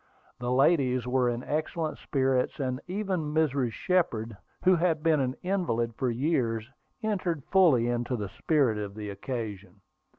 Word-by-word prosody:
The 125 0 -2
ladies 130 -2 +3
were 125 0 +2
in 120 +1 -3
excellent 155 +1 -2
spirits, 130 -1 0
and 130 -1 -2
even 185 -6 -2
Mrs. 140 -6 +2
Shepard, 115 - 0 0.3
who 185 0 +6
had 165 -3 +1
been 160 -2 +4
an 130 -1 0
invalid 170 -12 0
for 130 +2 -1
years, 120 -4 0 0.4
entered 185 -8 -1
fully 160 -12 +5
into 120 +1 -1
the 105 -4 -4
spirit 135 - +1
of 100 -1 -5
the 105 -1 -5
occasion. 105 -4 -6
130 Hz, 145 wpm, -28 LUFS, 120-160 Hz, 0.4 s, who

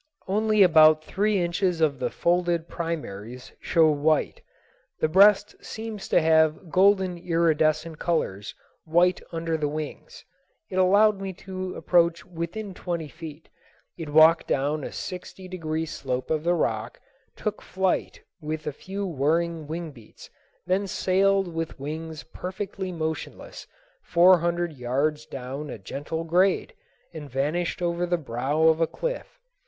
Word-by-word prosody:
Only 215 +1 +3
about 155 -3 +6
three 205 +4 0
inches 175 0 0
of 145 -4 +1
the - - -1
folded 175 -1 0
primaries 125 - -6
show 160 -2 +3
white. 150 +1 +1 0.6
The - - +2
breast 200 +4 +5
seems 220 -2 -6
to - - +5
have 160 0 +2
golden 190 -2 +3
iridescent 160 -2 +1
colors, 105 - -2 0.3
white 175 +3 +2
under 165 -1 -2
the 150 -1 -1
wings. 155 - -7 0.5
It 185 - -3
allowed 200 +2 +4
me 195 -1 -4
to 185 -1 -5
approach 170 -1 +2
within 180 +4 -5
twenty 170 -4 -4
feet. 160 0 -10 0.5
It 165 -3 -7
walked 160 +2 +6
down 145 +2 0
a - - -5
sixty 185 +1 -7
degree 160 -3 -3
slope 130 -5 -4
of 155 -1 0
the 175 +1 +2
rock, 115 -6 -2 0.4
took 215 - -4
flight 190 0 -1 0.2
with 155 0 -4
a 150 - -3
few 195 +7 -5
whirring 165 0 0
wing 165 +1 -5
beats, 115 -6 -15 0.3
then 190 +2 0
sailed 195 +1 +2
with 165 -3 -4
wings 155 +2 -6
perfectly 190 +2 -6
motionless 160 -3 -5 0.3
four 180 +1 +5
hundred 170 0 -1
yards 140 +4 -1
down 135 +3 -6
a - - -6
gentle 145 +10 -5
grade, 180 +3 +2 0.4
and 150 -3 -8
vanished 155 +7 -1
over 175 0 0
the 175 0 +1
brow 140 +2 -1
of 160 0 +4
a 165 - +3
cliff. - - -5
165 Hz, 140 wpm, -25 LUFS, 155-185 Hz, 0.6 s, about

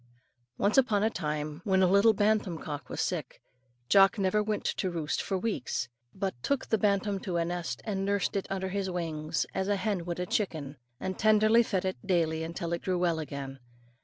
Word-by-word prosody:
Once 205 +6 +4
upon 215 -6 +2
a 220 - +2
time, 150 -1 -3
when 190 -1 +3
a - - +5
little 200 +4 +5
bantam 205 -4 +1
cock 145 -4 -6
was - - -5
sick, 160 -8 -2 0.5
Jock 195 - +6
never 195 +1 +2
went 210 0 -2
to 185 - 0
roost 160 -3 -2
for 195 - -1
weeks, 185 - -2 0.2
but 190 +4 -2
took 280 - 0
the 220 - +1
bantam 200 -1 +1
to 180 -3 -3
a 170 - +1
nest 175 0 -4
and 195 -3 -2
nursed 200 0 0
it 195 - -1
under 190 -1 -2
his 195 0 -2
wings, 165 -3 -2
as 190 0 -1
a 205 - +2
hen 195 -3 -1
would 175 0 -4
a 180 - -1
chicken, 155 -8 -2 0.2
and 190 -1 -4
tenderly 215 +2 +5
fed 195 -5 -1
it 185 - -1
daily 165 -4 0
till 170 0 -3
it 170 - -2
grew 185 -1 0
well 175 -2 +1
again. 140 -3 -6
190 Hz, 200 wpm, -29 LUFS, 165-205 Hz, 0.5 s, Jock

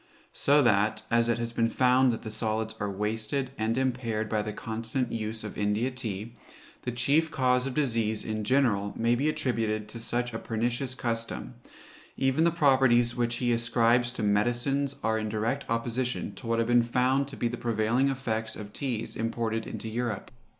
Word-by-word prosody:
So 145 +1 +4
that, 110 -2 +2
as 115 0 +3
it 120 - +2
has 115 0 -3
been 115 0 +1
found 130 +1 +4
that 115 - -5
the 110 - -5
solids 110 0 -1
are 105 - -1
wasted 110 +6 -2
and 110 +1 -1
impaired 120 -4 -1
by 110 -1 +1
the 105 0 -4
constant 115 +4 -3
use 110 0 -3
of 105 - -6
India 105 +5 +1
tea, 115 -3 -5 0.5
the 125 - -3
chief 140 +7 +2
cause 125 -1 +2
of 130 - -5
disease, 115 -7 0
in 110 -1 -3
general, 105 -5 +2
may 115 +1 +2
be 140 +6 +1
attributed 110 -7 -1
to 115 - -8
such 120 +1 -2
a 115 - -3
pernicious 120 +3 -2
custom; 115 0 -3 0.6
even 135 +4 +2
the - - +5
properties 130 -6 +4
which 120 -1 0
he 120 0 0
ascribes 120 +1 +2
to 120 - -4
medicines 120 +7 +1
are 110 0 +1
in 110 0 -3
direct 115 +6 -2
opposition 120 +2 -1
to 120 - -10
what 115 0 +1
have 115 0 +1
been 120 0 +6
found 125 +3 +1
to 140 - -9
be 120 - 0
the 120 - -3
prevailing 120 +3 +1
effects 115 -5 -2
of 105 -1 -9
teas 120 -5 -3
imported 115 0 -2
into - - -6
Europe. 115 -2 -3
115 Hz, 185 wpm, -28 LUFS, 110-125 Hz, 0.6 s, been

